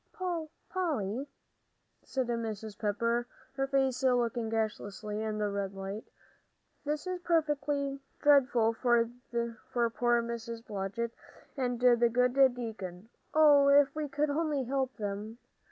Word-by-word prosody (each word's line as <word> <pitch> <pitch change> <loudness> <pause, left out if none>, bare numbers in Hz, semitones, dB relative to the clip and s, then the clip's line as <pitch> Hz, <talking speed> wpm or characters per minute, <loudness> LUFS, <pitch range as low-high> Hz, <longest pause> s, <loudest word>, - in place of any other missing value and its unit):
"Polly," 280 - -2 0.7
said 260 -2 -2
Mrs. 220 -3 -4
Pepper, 230 +3 0 0.3
her 270 0 -1
face 270 -2 +1
looking 240 -3 +1
ghastly 215 -1 -3
in 215 -1 -2
the 210 -1 0
red 200 -1 -3
light, 195 +3 -5 0.8
"this 300 +2 -2
is 365 -1 -3
perfectly 295 -5 0 0.2
dreadful 255 -6 +4
for 235 -1 +2 0.8
poor 240 0 +2
Mrs. 230 0 -6
Blodgett 210 +3 -3 0.4
and 245 -3 -1
the 240 -1 +5
good 250 +1 +2 0.2
deacon. 215 -5 -6 0.3
Oh, 295 -2 +7
if 280 0 +6
we 305 -1 -3
could 295 +1 0
only 295 -2 0
help 265 +1 -2
them!" 210 +1 -4
240 Hz, 120 wpm, -31 LUFS, 220-275 Hz, 0.8 s, Oh